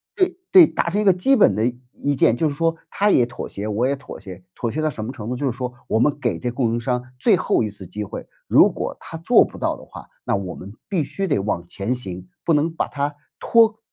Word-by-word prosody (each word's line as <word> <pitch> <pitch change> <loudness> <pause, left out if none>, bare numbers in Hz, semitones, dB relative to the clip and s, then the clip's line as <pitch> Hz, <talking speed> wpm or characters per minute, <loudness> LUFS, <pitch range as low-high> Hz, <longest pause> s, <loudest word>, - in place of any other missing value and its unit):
对 370 -4 +1
对， 355 -3 +9
达 - - -1
成 200 +4 0
一 - - -1
个 190 - +6
基 185 +10 +2
本 220 - +5
的 110 - +1 0.3
意 145 - -1
见， 120 - +4
就 155 - +1
是 - - -4
说 165 +3 0
他 205 +1 +1
也 125 -11 +4
妥 120 0 -7
协， 100 +2 -5
我 110 +4 +1
也 140 - 0
妥 140 - -10
协。 95 -2 -10
妥 120 - -3
协 155 +7 -3
到 155 - +1
什 120 -7 -6
么 115 - -4
程 105 -4 -8
度， 125 - -2
就 135 +2 -1
是 120 - -5
说 125 -1 -4
我 - - +1
们 140 +5 +2
给 120 -10 -1
这 120 +7 -3
供 120 -2 0
应 120 - 0
商 125 0 -1 0.2
最 - - +4
后 - - +1
1 110 - -2
次 100 -2 -5
机 105 +3 -5
会， 100 - -7 0.2
如 - - +6
果 - - -4
他 165 - -8
做 200 +9 +5
不 - - -11
到 - - -1
的 - - -13
话， - - -12 0.2
那 - - +1
我 95 -3 -4
们 100 +2 -10 0.2
必 185 -6 +1
须 195 +7 -3
得 145 - +1
往 95 -3 -2
前 100 +7 -2
行， 95 -6 -6 0.2
不 165 - +3
能 150 +2 +2
把 - - -1
它 145 0 -2 0.2
拖 225 -1 +4
125 Hz, 285 characters per minute, -22 LUFS, 110-165 Hz, 0.3 s, 对